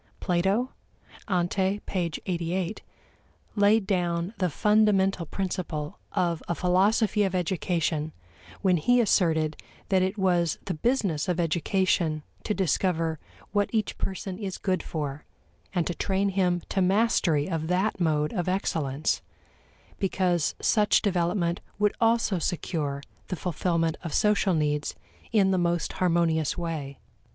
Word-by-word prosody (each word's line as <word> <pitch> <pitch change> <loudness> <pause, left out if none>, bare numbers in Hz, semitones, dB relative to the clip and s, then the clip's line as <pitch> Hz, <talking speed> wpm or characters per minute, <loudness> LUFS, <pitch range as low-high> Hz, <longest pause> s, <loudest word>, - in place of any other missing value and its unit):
Plato 195 +8 +1 0.6
(ante, 190 +2 +1
p. 190 - -2 0.3
88) 175 +2 -2 0.7
laid 205 0 +4
down 175 -1 0
the 180 -2 +2
fundamental 195 -2 +2
principle 170 -6 -4
of 170 -3 0
a 170 - -1
philosophy 200 +5 +2
of 190 -2 +1
education 165 -3 -1 0.5
when 185 -2 +4
he 245 +10 +3
asserted 160 -8 +2 0.3
that 190 -2 +3
it 190 +3 0
was 175 -4 +2
the 185 - -2
business 190 - 0
of 175 -1 0
education 170 -1 +1 0.2
to 210 - -1
discover 165 -3 0 0.3
what 205 0 +1
each 220 -2 -1
person 190 0 -4
is 195 -3 -4
good 185 -3 0
for, 150 -2 -4 0.5
and 175 -3 0
to 175 - -1
train 195 +2 0
him 180 -3 +1
to 195 - 0
mastery 185 -6 +2
of 165 -3 -2
that 185 +5 0
mode 150 -3 +1
of 180 -4 -1
excellence, 155 -6 -1 0.8
because 180 -4 +1
such 210 -2 +3
development 175 -2 0 0.2
would 210 0 +2
also 225 -4 +3
secure 150 -5 -2 0.2
the 185 - -3
fulfillment 165 -1 -1
of 165 - -4
social 210 -3 +3
needs 150 -1 0 0.4
in 200 -4 +4
the 185 - +2
most 175 -1 0
harmonious 170 -3 +1
way. 155 -5 -4
180 Hz, 130 wpm, -27 LUFS, 165-195 Hz, 0.8 s, laid